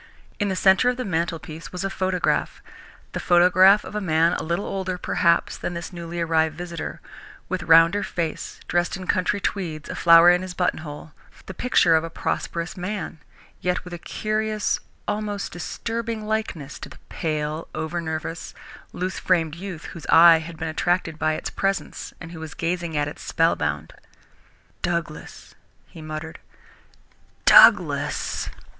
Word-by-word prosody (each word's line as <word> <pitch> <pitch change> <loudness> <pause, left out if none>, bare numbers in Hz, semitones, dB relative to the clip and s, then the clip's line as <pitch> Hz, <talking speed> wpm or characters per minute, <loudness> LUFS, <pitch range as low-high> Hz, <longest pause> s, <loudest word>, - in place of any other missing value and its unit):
In 205 - +1
the 190 - -1
centre 190 +6 +4
of 250 - -1
the 255 - -3
mantelpiece 165 -4 -3
was 180 - -5
a 195 - -1
photograph, 185 -2 -1 0.5
the - - -4
photograph 185 +3 +5
of - - -9
a 210 - -2
man 165 -1 +2
a - - -2
little 170 +5 -2
older, 185 -2 -3
perhaps, 170 -1 +1
than 175 - -4
this 170 +1 -6
newly 170 0 -6
arrived 160 -1 +1
visitor, 170 -2 -6 0.5
with - - -2
rounder 165 +5 +5
face, 165 -5 -4
dressed 175 +2 0
in 185 - -8
country 185 +3 +1
tweeds, 165 -7 -3
a - - -4
flower 170 +1 +7
in 180 0 +2
his 185 -1 -7
buttonhole, 155 -4 -3 0.3
the 190 - -8
picture 175 -6 +3
of 160 - +2
a 165 - -5
prosperous 170 +1 -3
man, 180 -3 -5 0.4
yet 180 0 -1
with 180 - -9
a 175 - -6
curious, 215 +2 -1 0.3
almost 205 -1 -3
disturbing 225 +5 -4
likeness 210 -10 -3
to - - -8
the - - -14
pale, 155 0 -3
over 160 +2 -3
nervous, 160 0 -5 0.4
loose 185 +1 -3
framed 165 -4 +1
youth 175 -2 -7
whose 165 - -9
eye 165 0 +8
had 165 +1 -9
been 160 - -4
attracted 165 0 -1
by 155 0 +1
its - - -4
presence, 195 0 -2
and 165 -1 -9
who 165 - -9
was 160 -1 -8
gazing 170 -2 -2
at 145 0 +1
it, 145 - -8
spellbound. 75 - 0 0.9
"Douglas!" - - -4 0.3
he 165 - -13
muttered. 155 +2 -7 1.1
"Douglas!" - - +5
170 Hz, 155 wpm, -23 LUFS, 160-190 Hz, 1.1 s, eye